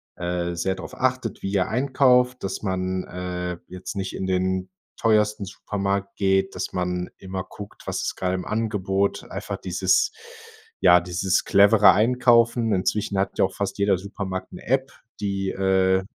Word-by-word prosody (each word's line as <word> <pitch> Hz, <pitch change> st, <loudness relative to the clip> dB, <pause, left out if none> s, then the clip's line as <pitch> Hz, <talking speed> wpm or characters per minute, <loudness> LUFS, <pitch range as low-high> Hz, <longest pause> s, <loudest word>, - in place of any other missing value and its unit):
äh, 85 Hz, 0 st, -2 dB
sehr 95 Hz, +2 st, -1 dB
drauf 95 Hz, -, -9 dB
achtet, 130 Hz, -3 st, -1 dB
wie 95 Hz, -, -2 dB
ihr 95 Hz, -2 st, +1 dB
einkauft, 125 Hz, 0 st, +3 dB
dass 95 Hz, -, -3 dB
man, 95 Hz, -1 st, -1 dB
äh, 90 Hz, -1 st, -4 dB
jetzt 90 Hz, +2 st, -7 dB
nicht 95 Hz, -1 st, -3 dB
in 95 Hz, -, -3 dB
den 95 Hz, 0 st, 0 dB, 0.3 s
teuersten 105 Hz, -2 st, +2 dB
Supermarkt 100 Hz, 0 st, -3 dB
geht, 95 Hz, -1 st, +1 dB
dass -, -, -4 dB
man 90 Hz, 0 st, -2 dB
immer 95 Hz, -1 st, -5 dB
guckt, 100 Hz, +1 st, -11 dB
was -, -, -2 dB
ist -, -, -2 dB
gerade 95 Hz, 0 st, -1 dB
im 90 Hz, -, -4 dB
Angebot 100 Hz, -3 st, -1 dB
einfach -, -, -5 dB
dieses -, -, +1 dB, 0.7 s
ja, 90 Hz, -, +8 dB
dieses 90 Hz, +2 st, 0 dB
clevere 100 Hz, +1 st, +6 dB
Einkaufen. 115 Hz, 0 st, +3 dB
Inzwischen 100 Hz, +1 st, 0 dB
hat 95 Hz, -, -1 dB
ja -, -, +5 dB
auch -, -, -5 dB
fast -, -, -3 dB
jeder 100 Hz, -2 st, +2 dB
Supermarkt 95 Hz, -1 st, -5 dB
'ne -, -, -10 dB
App, 135 Hz, +2 st, +1 dB, 0.3 s
die, 100 Hz, -1 st, -1 dB
äh, 95 Hz, 0 st, +2 dB
95 Hz, 160 wpm, -24 LUFS, 95-105 Hz, 0.7 s, ja